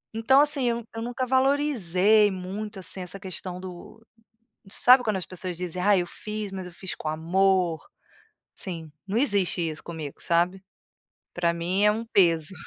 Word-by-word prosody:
Então 265 +5 +5
assim, 285 -4 +1
eu 235 0 -1
eu 225 - -4
nunca 245 +2 -3
valorizei 220 - +3
muito 195 +3 -6
assim 185 +1 -7
essa 180 +2 -7
questão 185 -1 -6
do 185 +4 -10 0.7
sabe 250 0 +6
quando 215 -3 0
as 185 - -4
pessoas 185 -1 -6
dizem: 180 0 -4
"Ai, 200 -2 +4
eu 175 - -3
fiz, 210 +2 -6
mas 190 -1 -6
eu 180 - -10
fiz 190 +1 -6
com 155 - -5
amor", 175 +1 +1 0.7
assim, 165 -5 -6 0.2
não 200 +3 -3
existe 200 -9 +1
isso 155 -1 -6
comigo, 160 -4 -7
sabe? 175 +3 +1 0.7
Para 170 -1 +1
mim 180 +4 0
é 210 - +6
um 225 +2 -3
peso. 170 -5 +3
190 Hz, 165 wpm, -26 LUFS, 175-220 Hz, 0.7 s, sabe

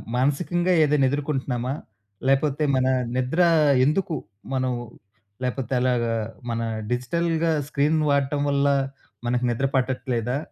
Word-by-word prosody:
మానసికంగా 170 +7 +1
ఏదైనా 150 -2 +3
ఎదుర్కొంటున్నామా? 135 -3 -2 0.5
లేకపోతే 135 +2 +2
మన 130 0 +2 0.3
నిద్ర 130 +7 +1 0.4
ఎందుకు 165 +4 0 0.4
మనం 130 -1 0 0.7
లేపోతే 125 0 -2
అలాగా 120 -2 +1 0.4
మన 115 0 -1 0.3
డిజిటల్‌గా 165 +6 0 0.2
స్క్రీన్ 150 +2 +1
వాడటం 140 0 +1
వల్ల 140 0 +2 0.6
మనకు 125 +1 0
నిద్ర 125 +4 0
పట్టట్లేదా? 125 -1 0
135 Hz, 105 wpm, -24 LUFS, 125-150 Hz, 0.7 s, ఏదైనా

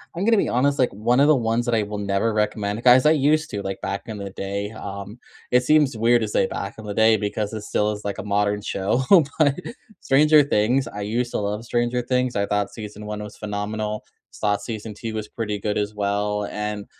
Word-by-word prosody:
I'm 180 - -2
gonna 225 0 +4
be - - +1
honest, 140 +3 +2
like, 130 - +2
one 120 +5 +1
of 145 - +5
the 155 - +6
ones 115 0 0
that 120 - 0
I 110 - +2
will 105 0 -4
never 100 +2 0
recommend 105 0 -1
'cause, 125 +2 +6
I - - +6
used 155 +1 +2
to, 100 -3 -4
like, 95 0 -5
back 100 - -3
in 110 -3 -6
the 100 0 -5
day, 100 +1 -4
um, 100 0 -7 0.3
it 125 0 +3
seems 145 -4 +3
weird 120 +1 +3
to 110 - -1
say 100 - +1
back 100 +1 -5
in 110 - -9
the 105 - -4
day 110 +1 +4
because 105 +1 -3
it 110 - -4
still 105 +1 0
is 105 0 -7
like 100 - -3
a - - -4
modern 105 0 0
show, 100 +5 -1 0.4
but 145 -3 +4 0.4
Stranger 150 +2 +5
Things, 130 +1 +1
I 105 - -7
used 120 +4 -1
to - - -1
love 105 +3 -3
Stranger 120 +1 0
Things, 125 0 0
I 100 0 +1
thought 105 -1 -1
season 105 -1 -8
1 105 0 -5
was 105 - -9
phenomenal, 105 +1 -4 0.4
thought 105 -1 +1
season 110 0 -6
2 110 +1 -6
was 110 -1 -5
pretty 105 -3 -3
good 105 +1 -2
as 105 0 -2
well, 105 0 -1
and 105 -1 -4
105 Hz, 230 wpm, -23 LUFS, 105-120 Hz, 0.4 s, the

